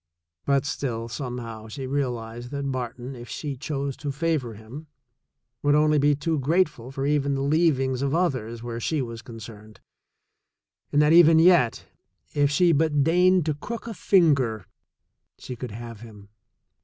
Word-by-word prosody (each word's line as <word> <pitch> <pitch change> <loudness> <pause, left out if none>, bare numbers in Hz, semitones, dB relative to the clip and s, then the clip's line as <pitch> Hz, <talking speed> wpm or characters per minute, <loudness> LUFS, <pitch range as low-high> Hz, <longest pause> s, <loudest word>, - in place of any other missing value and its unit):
But 140 0 +2
still, 120 -4 -3
somehow, 120 -3 -6
she 130 +5 -6
realized 120 -3 -3
that 140 0 -3
Barton, 125 +1 -5
if 120 -1 -10
she 145 -3 -4
chose 140 0 -4
to 145 - -4
favor 140 -6 -1
him, 120 +9 -11 0.7
would 145 0 +3
only 150 0 +4
to - - +3
be 145 +1 +3
too 155 +2 -1
grate 165 +8 +3
ful 125 -3 -12
for 135 0 -4
even 140 -1 +1
the 135 - -2
leavings 140 -4 +1
of 140 +2 0
others 120 -10 -1
where 120 -1 -5
she 155 +6 -1
was 115 -1 -7
concerned, 110 -3 -11 1.1
and 145 +1 +4
that 150 +2 +4
even 165 -1 +7
yet, 160 -8 +4 0.5
if 145 -1 +2
she 170 +4 +3
but 150 -2 +2
deigned 180 +2 +3
to 155 - 0
crook 230 +12 -7
a 230 - -5
finger, 140 - +2 0.7
she 125 - -8
could 125 +1 -6
have 115 +1 -8
him. 105 -3 -13
135 Hz, 165 wpm, -25 LUFS, 120-150 Hz, 1.1 s, even